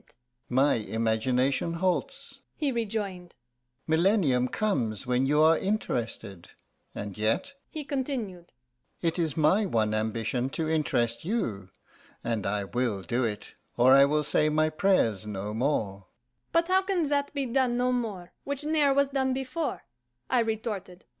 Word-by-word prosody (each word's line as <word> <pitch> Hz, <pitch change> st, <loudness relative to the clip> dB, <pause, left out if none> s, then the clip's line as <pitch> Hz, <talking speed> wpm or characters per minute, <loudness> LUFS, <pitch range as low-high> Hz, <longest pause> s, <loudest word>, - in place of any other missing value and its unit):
"My 135 Hz, +3 st, +3 dB
imagination 120 Hz, +7 st, 0 dB
halts," 180 Hz, +1 st, -2 dB, 0.2 s
he 295 Hz, -3 st, 0 dB
rejoined. 205 Hz, -6 st, -3 dB, 0.5 s
"Millennium 160 Hz, -, +3 dB
comes 120 Hz, -, -1 dB
when 125 Hz, +1 st, +1 dB
you 150 Hz, +2 st, +4 dB
are 160 Hz, +1 st, +5 dB
interested. 115 Hz, -, -3 dB, 0.5 s
And 100 Hz, -2 st, -5 dB
yet," 115 Hz, -, 0 dB, 0.2 s
he 310 Hz, -, -5 dB
continued, 250 Hz, -11 st, -4 dB, 0.5 s
"it 165 Hz, +1 st, 0 dB
is 160 Hz, -4 st, -1 dB
my 185 Hz, +7 st, +3 dB
one 110 Hz, -, +1 dB
ambition 110 Hz, +3 st, -1 dB
to 160 Hz, -2 st, -1 dB
interest 120 Hz, -7 st, 0 dB
you, 115 Hz, -, -2 dB, 0.5 s
and 115 Hz, -5 st, -1 dB
I 100 Hz, 0 st, -1 dB
will 110 Hz, -2 st, -2 dB
do 120 Hz, +9 st, -1 dB
it, 105 Hz, -3 st, -4 dB, 0.2 s
or 125 Hz, +2 st, +6 dB
I 140 Hz, 0 st, +8 dB
will 150 Hz, +2 st, +1 dB
say 150 Hz, +1 st, +2 dB
my 155 Hz, +1 st, +2 dB
prayers 155 Hz, -, +1 dB
no 105 Hz, 0 st, -4 dB
more." 110 Hz, -6 st, -1 dB, 0.4 s
"But 335 Hz, +1 st, +2 dB
how 375 Hz, +1 st, +4 dB
can 380 Hz, -3 st, 0 dB
that 285 Hz, -1 st, 0 dB
be 280 Hz, -1 st, 0 dB
done 250 Hz, -1 st, +1 dB
no 250 Hz, +1 st, +2 dB
more, 210 Hz, -8 st, -3 dB
Which 280 Hz, +1 st, -4 dB
ne'er 295 Hz, -3 st, +2 dB
was 280 Hz, 0 st, +3 dB
done 265 Hz, -1 st, 0 dB
before?" 270 Hz, +4 st, -3 dB
155 Hz, 140 wpm, -28 LUFS, -, 0.5 s, I